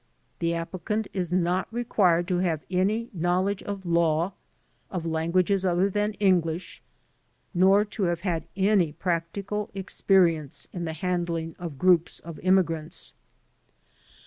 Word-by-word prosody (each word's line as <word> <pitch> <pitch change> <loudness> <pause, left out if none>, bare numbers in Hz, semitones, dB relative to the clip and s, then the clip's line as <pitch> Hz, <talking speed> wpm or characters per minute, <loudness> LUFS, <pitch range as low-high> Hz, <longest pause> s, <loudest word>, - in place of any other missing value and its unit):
The 170 0 0
applicant 185 +5 -3
is 180 -3 -2
not 180 +2 +1
required 190 -7 +2
to 180 -1 +1
have 165 -4 -1
any 210 +6 0
knowledge 185 +3 0
of 200 -2 -6
law, 170 +1 +2 0.6
of 180 -3 -4
languages 170 +4 +1
other 185 +2 +2
than 210 +2 0
English, 180 -4 0 0.7
nor 195 +3 +5
to 210 -1 -2
have 175 -1 -1
had 170 -4 -2
any 190 -5 +3
practical 190 +5 -2
experience 180 -6 +1
in 175 -2 -4
the 160 - -3
handling 170 -2 -2
of 165 -6 -6
groups 175 +1 +3
of 165 -1 -9
immigrants. 170 -3 +1
180 Hz, 125 wpm, -26 LUFS, 170-195 Hz, 0.7 s, nor